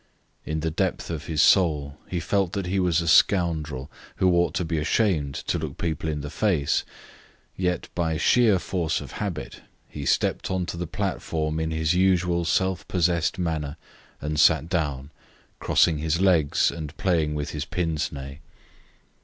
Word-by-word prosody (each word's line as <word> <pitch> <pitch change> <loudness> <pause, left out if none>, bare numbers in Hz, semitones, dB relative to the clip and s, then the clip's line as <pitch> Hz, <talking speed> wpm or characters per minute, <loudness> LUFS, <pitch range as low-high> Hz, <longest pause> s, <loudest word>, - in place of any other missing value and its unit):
In 80 0 -2
the 80 0 -1
depth 80 - -2
of 80 -2 -5
his 80 -2 +2
soul 75 -6 +3
he 90 - -2
felt 95 +1 0
that 100 -2 -2
he 95 +2 0
was 85 -2 +2
a 85 - -4
scoundrel, 80 -6 +2 0.2
who 95 -1 +3
ought 85 +1 +1
to 90 -2 0
be 80 -1 -1
ashamed 75 - +1
to 85 - -2
look 75 -3 -5
people 80 -2 -2
in 75 -1 -2
the 75 +1 -6
face, 85 -10 +1 0.7
yet, 90 -2 -1
by 80 -2 -1
sheer 110 +3 +4
force 85 -2 -1
of - - -9
habit, 85 - -5 0.3
he 75 - -7
stepped 70 - 0
on 95 -1 -1
to 85 - -5
the 85 0 -4
platform 80 -5 -2
in 80 0 -1
his 80 0 0
usual 90 -2 +2
self 95 +1 0
possessed 85 -1 +1
manner, 80 -4 -2 0.4
and 75 +1 -3
sat 80 +1 +5
down, 70 -5 -2 0.5
crossing 80 -3 +3
his 80 +2 0
legs 85 -7 +3
and 80 -2 -7
playing 85 -7 +1
with 75 -1 -3
his 75 0 -4
pince 80 -3 -2
nez. 70 0 -8
80 Hz, 170 wpm, -25 LUFS, 75-90 Hz, 0.7 s, sat